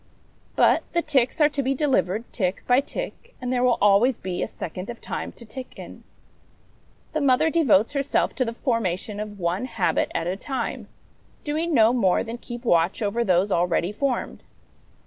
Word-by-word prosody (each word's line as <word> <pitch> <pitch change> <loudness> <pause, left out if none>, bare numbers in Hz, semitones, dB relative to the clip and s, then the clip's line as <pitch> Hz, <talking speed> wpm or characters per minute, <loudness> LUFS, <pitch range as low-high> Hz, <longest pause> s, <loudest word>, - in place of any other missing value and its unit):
But - - +4
the 340 0 +1
ticks 265 -3 +1
are 300 -1 +5
to 290 -1 -2
be 270 +1 0
delivered 230 - +1
tick 185 -3 -1
by 250 +1 +4
tick, - - -7
and 250 0 -2
there 245 - +1
will 250 -1 +3
always 210 +5 +4
be 180 -1 -4
a - - -1
second 185 +4 -7
of 240 - -7
time - - -5
to 235 - -13
tick 255 +3 -9
in. - - -10 1.1
The 310 - 0
mother 280 +3 +3
devotes 255 - +3
herself 280 0 0
to 260 - +2
the 230 - -3
formation 210 -5 -2
of 210 -1 -6
one 180 +5 -1
habit 230 -7 0
at - - 0
a 180 +2 -1
time, 240 0 -4 0.6
doing 315 +2 -1
no 225 0 +5
more 195 -8 +2
than 235 +1 -6
keep 240 0 -8
watch 170 +1 +2
over 225 +3 0
those 190 0 +2
already 175 +1 +1
formed. 265 +4 -2
235 Hz, 180 wpm, -24 LUFS, 195-270 Hz, 1.1 s, are